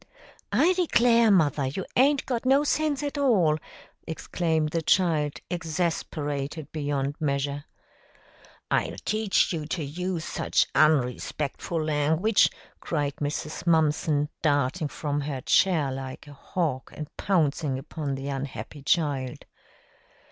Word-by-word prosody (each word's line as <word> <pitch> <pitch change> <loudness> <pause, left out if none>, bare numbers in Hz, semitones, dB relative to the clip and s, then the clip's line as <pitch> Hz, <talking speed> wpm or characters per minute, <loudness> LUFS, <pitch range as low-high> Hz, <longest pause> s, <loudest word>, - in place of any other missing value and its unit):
"I 360 +3 +4
declare, 235 -10 +4
mother, 150 -8 +3
you 175 +8 -4
aint 275 +2 +4
got 245 -3 -2
no 270 +3 +4
sense 300 -1 0
at 290 0 -3
all!" 185 - +3 0.5
exclaimed 160 -1 -1
the 165 - 0
child, 155 -4 +2 0.2
exasperated 155 -3 -3
beyond 145 -1 -2
measure. 140 -1 -1 1.1
"I'll - - +1
teach 215 -3 +2
you 155 -3 -3
to 160 0 -2
use 170 +3 -3
such - - +1
unrerspectful 150 +2 +1
language!" 155 +8 +3 0.3
cried 145 -4 -2
Mrs. 150 +3 -4
Mumpson, 150 -2 +2
darting 145 +2 +1
from 145 0 -3
her 140 -2 -4
chair 160 -3 +3
like 130 +1 -6
a 145 - -12
hawk 145 -2 -3
and 150 -1 -8
pouncing 155 -6 +1
upon 140 0 -4
the 135 +1 -6
unhappy 140 +1 -5
child. 135 -4 0
155 Hz, 120 wpm, -26 LUFS, 145-180 Hz, 1.1 s, I